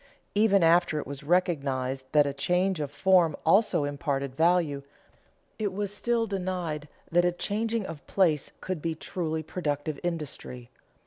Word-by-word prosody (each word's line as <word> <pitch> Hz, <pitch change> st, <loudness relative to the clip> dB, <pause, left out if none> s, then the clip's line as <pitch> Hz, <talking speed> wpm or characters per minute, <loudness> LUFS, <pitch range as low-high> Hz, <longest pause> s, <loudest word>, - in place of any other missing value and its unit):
Even 200 Hz, -3 st, +4 dB
after 170 Hz, -1 st, +4 dB
it 150 Hz, -, -3 dB
was 140 Hz, 0 st, -7 dB
recognized 140 Hz, -6 st, 0 dB
that 150 Hz, -1 st, +5 dB
a 140 Hz, -, -2 dB
change 180 Hz, +5 st, +1 dB
of 145 Hz, -2 st, -2 dB
form 165 Hz, +2 st, +3 dB
also 195 Hz, -1 st, +4 dB
imparted 140 Hz, -2 st, -2 dB
value, 165 Hz, -3 st, +2 dB, 0.8 s
it 210 Hz, -2 st, 0 dB
was 205 Hz, +1 st, -3 dB
still 235 Hz, +2 st, +1 dB
denied 180 Hz, -7 st, -3 dB, 0.2 s
that 175 Hz, +1 st, +4 dB
a 175 Hz, -, +3 dB
changing 220 Hz, +4 st, -1 dB
of 160 Hz, -4 st, -9 dB
place 160 Hz, -7 st, +2 dB
could 185 Hz, -4 st, -4 dB
be 165 Hz, 0 st, -2 dB
truly 160 Hz, -1 st, -3 dB
productive 150 Hz, -3 st, -3 dB
industry. 150 Hz, -7 st, -5 dB
165 Hz, 145 wpm, -28 LUFS, 145-185 Hz, 0.8 s, that